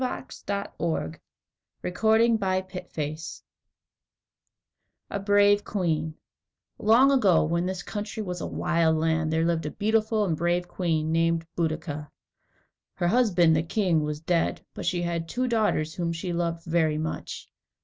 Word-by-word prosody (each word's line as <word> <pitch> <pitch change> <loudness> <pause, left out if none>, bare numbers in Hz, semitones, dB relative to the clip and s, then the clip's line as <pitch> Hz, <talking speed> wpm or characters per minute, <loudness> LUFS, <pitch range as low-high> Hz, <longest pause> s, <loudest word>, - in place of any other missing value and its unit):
[Illustration: 205 -5 -4 1.1
Queen 220 +5 +3
Boadicea] 180 -5 -3 1.7
=A 200 - -2
Brave 205 +1 +4
Queen= 160 -5 -1 0.6
Long 240 +6 +5
ago, 205 -11 +4
when 170 +3 0
this 185 -1 -4
country 215 +1 -5
was 180 -3 -5
a - - -3
wild 165 -2 +1
land, 160 0 +1
there 160 +1 +2
lived 165 -2 0
a - - -2
beautiful 215 +2 +1
and 165 -5 0
brave 175 +2 0
queen 160 -4 -1
named 165 0 +1
Boadicea. 155 -3 -2 0.9
Her 175 - 0
husband, 180 -8 +4
the 155 - +2
king, 170 -2 +1
was 150 0 -3
dead, 165 +1 0
but - - -5
she 175 -1 0
had 170 -1 -2
two 255 +1 -1
daughters 210 -9 +1
whom 170 -2 -2
she 170 +2 -4
loved 170 -1 -2
very 160 -2 +1
much. 155 +1 -5
175 Hz, 135 wpm, -26 LUFS, 160-205 Hz, 1.7 s, Long